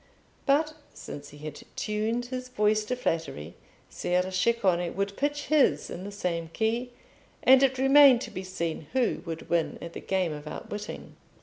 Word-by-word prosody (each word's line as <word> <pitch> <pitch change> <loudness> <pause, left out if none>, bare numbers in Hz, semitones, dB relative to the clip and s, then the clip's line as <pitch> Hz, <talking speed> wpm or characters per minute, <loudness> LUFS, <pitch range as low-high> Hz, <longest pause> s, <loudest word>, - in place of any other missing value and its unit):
But 305 +3 +3 0.2
since 145 0 -8
he 145 - -13
had 150 0 -8
tuned 220 +3 -1
his 255 0 -5
voice 215 -2 +2
to 250 - -1
flattery, 165 - -3 0.3
Ser 180 +1 -1
Ceccone 185 -4 +1
would 200 +1 -2
pitch 290 +1 -1
his 300 -3 +3
in 180 +2 -6
the 205 - -6
same 175 -5 -2
key, 230 +3 0 0.5
and 265 +1 +7
it 265 -1 +3
remained 270 -1 +7
to - - -6
be 185 -1 -5
seen 170 -4 -4
who 255 -3 +1
would 165 -1 -5
win 170 -2 0
at 170 - -8
the - - -6
game 185 -4 0
of 150 0 -8
outwitting. 205 +6 -7
205 Hz, 170 wpm, -28 LUFS, 170-255 Hz, 0.5 s, and